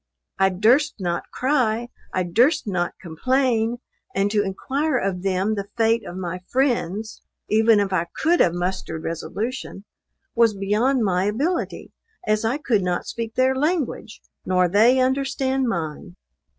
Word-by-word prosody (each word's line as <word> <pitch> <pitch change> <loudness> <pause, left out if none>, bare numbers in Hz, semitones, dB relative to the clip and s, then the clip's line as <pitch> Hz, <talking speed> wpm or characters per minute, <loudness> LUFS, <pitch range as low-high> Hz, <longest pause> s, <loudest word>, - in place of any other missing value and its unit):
I 190 0 +5
durst 240 +11 +3
not 175 -2 -3
cry 240 -4 0 0.2
I 185 - 0
durst 240 - +2
not 180 -4 -2
complain; 235 - 0 0.4
and 200 +1 +1
to 210 -1 +2
inquire 265 +9 -1
of 190 -4 -2
them 195 +2 0
the 200 -2 -4
fate 225 0 +2
of 175 - -7
my 180 -1 -4
friends 225 -6 -1 0.3
(even 220 0 +5
if 200 -2 0
I 170 -2 0
could 340 +2 +2
have 170 -1 +3
mustered 175 -3 -3
resolution) 205 +5 -5 0.5
was 230 -2 +3
beyond 220 +6 +1
my 185 -2 +1
ability, 285 - -2 0.3
as 215 +1 +1
I 230 +5 0
could 235 -9 +1
not 180 -1 -1
speak 225 -1 -5
their 260 +1 +3
language, 295 -6 -2 0.2
nor 180 -1 +2
they 220 +8 +4
understand 265 0 0
mine. 155 - -4
220 Hz, 145 wpm, -23 LUFS, 185-255 Hz, 0.5 s, I